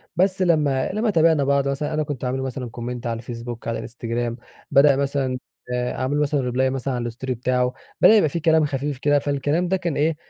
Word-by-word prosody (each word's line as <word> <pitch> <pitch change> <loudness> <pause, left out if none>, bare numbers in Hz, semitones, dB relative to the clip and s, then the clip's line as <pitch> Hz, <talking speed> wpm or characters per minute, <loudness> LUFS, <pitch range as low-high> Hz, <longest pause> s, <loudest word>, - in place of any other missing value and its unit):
بس 190 +2 +2
لمَّا 150 -7 +2
لمَّا 215 +3 0
تابعنا 160 -5 +4
بعض 140 0 +2
مثلًا 145 +3 -2
أنا 155 0 +1
كنت 145 -3 -5
أعمل 125 +1 -1
له 130 - -3
مثلًا 130 -1 -4
comment 120 +1 -5
على 115 -1 -2
الفيسبوك، 115 0 -7
على 115 - -1
الإنستجرام 120 0 -4 0.3
بدأ 140 0 +6
مثلًا 135 -2 -1 0.4
آآ 125 0 -1
أعمل 130 +3 -1
له - - +2
مثلًا 140 -4 0
reply 130 +1 +1
مثلًا 135 0 -2
على 120 -1 -2
الstory 130 +2 -5
بتاعه، 125 +1 0 0.3
بدأ 220 - +8
يبقى 180 -8 +4
في 170 - -3
كلام 160 -1 +3
خفيف 145 0 -3
كده 145 +2 +2
فالكلام 145 +5 0
ده 190 +1 +1
كان 170 -5 -2
إيه 155 +2 +2
140 Hz, 215 wpm, -23 LUFS, 125-150 Hz, 0.4 s, بدأ